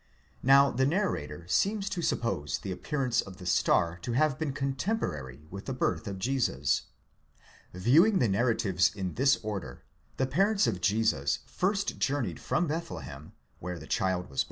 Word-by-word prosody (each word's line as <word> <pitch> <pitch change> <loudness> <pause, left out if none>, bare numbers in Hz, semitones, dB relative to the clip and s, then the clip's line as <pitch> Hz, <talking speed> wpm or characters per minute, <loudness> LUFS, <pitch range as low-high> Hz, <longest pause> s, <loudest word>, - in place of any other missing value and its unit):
Now 140 +1 +6
the 130 +2 +1
narrator 85 - -2
seems 200 - +1
to 175 - -2
suppose 75 - -1
the 95 - -6
appearance 125 - 0
of 95 -2 -11
the 90 - -10
star 85 -1 +2
to 120 +6 -3
have 150 +1 +2
been. 155 -3 -1
cotemporary 135 - -3
with 100 +1 -7
the 135 - -3
birth 125 - -1
of 100 -1 -4
Jesus. 130 +5 0 0.8
Viewing 155 - +4
the 125 - +3
narratives 100 -4 +2
in 95 -3 -3
this 135 +2 +3
order, 95 -13 -5 0.3
the 130 - +2
parents 195 +9 +2
of 90 - -1
Jesus 100 -11 +1
first 200 +2 -1
journeyed 120 - -1
from 170 - 0
LDethlehem, 80 - -6 0.3
where 90 0 -5
the 80 - -10
child 95 +1 0
was. 70 -1 -6
115 Hz, 155 wpm, -29 LUFS, 90-140 Hz, 0.8 s, Now